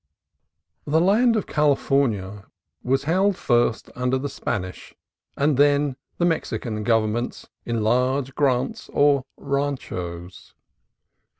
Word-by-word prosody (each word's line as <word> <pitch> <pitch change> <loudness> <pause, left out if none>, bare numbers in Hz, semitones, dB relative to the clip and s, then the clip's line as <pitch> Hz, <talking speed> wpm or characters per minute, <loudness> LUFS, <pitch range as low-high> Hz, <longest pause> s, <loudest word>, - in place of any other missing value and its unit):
The 155 +2 +2
land 220 +7 +4
of 215 - 0
California 135 - 0 0.3
was 135 +2 0
held 190 +6 +2
under - - -20
first 120 -2 +1
the 130 +2 -1
Spanish 95 -9 -5 0.4
and 140 -1 +2
then 145 -1 +3 0.2
the 175 - +1
Mexican 120 -9 -2
governments 115 +1 0 0.2
in 115 -2 -1
large 130 +4 +1
grants, 130 -2 0
or 145 -1 +4 0.2
ranchos. 95 -12 -4
135 Hz, 105 wpm, -23 LUFS, 115-145 Hz, 0.4 s, land